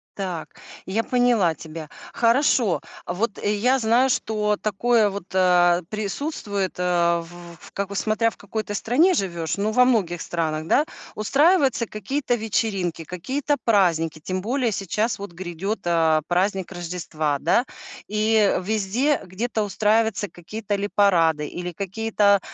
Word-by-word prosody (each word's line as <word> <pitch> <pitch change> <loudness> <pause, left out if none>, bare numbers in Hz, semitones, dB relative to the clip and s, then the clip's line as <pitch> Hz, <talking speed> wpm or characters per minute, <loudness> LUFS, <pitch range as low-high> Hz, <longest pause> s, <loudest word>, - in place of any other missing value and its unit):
Так, 180 -5 -5 0.3
я 220 +4 0
поняла 240 -9 +2
тебя. 155 0 -9 0.2
Хорошо. 235 - +2 0.2
А - - -3
вот 205 +3 -2
я 210 +6 +2
знаю, 240 +2 +3
что 210 -3 0
такое 215 +2 +2
вот, 200 -2 -6
э, 180 -1 +4
присутствует, 210 - -3
э, 175 -1 +2
в 170 0 -13
как 200 0 -3
бы, 200 - -6
смотря 220 +3 +1
в - - -18
какой 215 +2 -4
ты 205 - -6
стране 285 - +3
живешь, 170 - -2
но 205 +2 0
во 250 +2 +5
многих 185 -9 +1
странах, 155 -2 -2
да, 300 - +3 0.3
устраиваются 275 - +3
какие-то 245 +6 -2
вечеринки, 195 -6 -1
какие-то 265 - -2
праздники, 170 -7 +2
тем 185 +4 -3
более 245 +2 0
сейчас 210 +3 -1
вот 200 -3 -7
грядет, 185 +4 -4
а, 160 -2 +3
праздник 190 +1 0
Рождества, 165 -4 -3
да. 170 - +2 0.4
И 215 0 +2
везде 220 +8 0
где-то 215 +4 -2
устраиваются 210 +1 +1
какие-то 205 +4 -6
или 200 0 -1
парады, 165 -7 +3
или 180 0 -5
какие-то, 200 +1 +1
200 Hz, 140 wpm, -23 LUFS, 175-225 Hz, 0.4 s, во